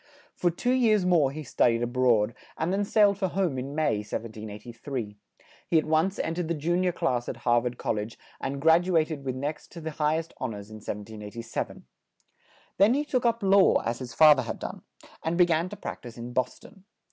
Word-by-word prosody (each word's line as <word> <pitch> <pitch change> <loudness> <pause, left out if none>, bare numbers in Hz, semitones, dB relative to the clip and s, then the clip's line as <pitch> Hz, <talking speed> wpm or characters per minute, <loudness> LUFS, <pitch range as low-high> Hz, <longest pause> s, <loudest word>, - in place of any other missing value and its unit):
For 175 - +2
two 245 +9 -1
years 220 -7 +3
more 170 -7 +4
he 155 +3 -6
stud 120 -3 +2
ied 115 +1 -1
a - - +2
broad, 120 -3 +2 0.2
and 165 +4 -1
then 200 +1 +1
sailed 205 -1 +3
for 190 - +1
home 175 -7 -1
in 135 +3 -5
May, 155 -8 +1
1783. 110 +2 -6 0.5
He 165 - +3
at 155 - +2
once 160 +5 +1
en 165 - -1
tered 175 -1 -2
the 170 - -1
jun 170 +4 0
ior 180 - +2
class 125 -7 -1
at - - -5
Har 120 -1 +4
vard 125 0 -4
Col - - -1
lege 105 +2 -5 0.2
and 135 +1 -3
grad 165 +4 +4
u 185 - +1
a 155 - +4
ted 155 -4 -6
with 130 -2 -3
next 145 +4 -5
to 170 - -8
the 160 -1 -5
high 150 +1 +1
est 165 0 -5
hon 125 -5 -3
ors 100 +1 -10
in 110 - -8
1787. 105 +2 -6 0.9
Then 210 +6 +6
he 295 +1 0
took 255 -4 +1
up 230 -2 0
law, 195 0 +5
as 115 0 -2
his 125 -3 -7
fa 155 +1 +9
ther 130 - -1
had 120 - -5
done, - - -7 0.4
and 165 +1 -1
be 180 - +7
gan 170 +1 0
to 205 - -7
prac 205 - -7
tise 120 -2 -10
in 120 +1 -7
Bos 130 0 -1
ton. 195 -4 -17
150 Hz, 230 wpm, -27 LUFS, 120-180 Hz, 0.9 s, fa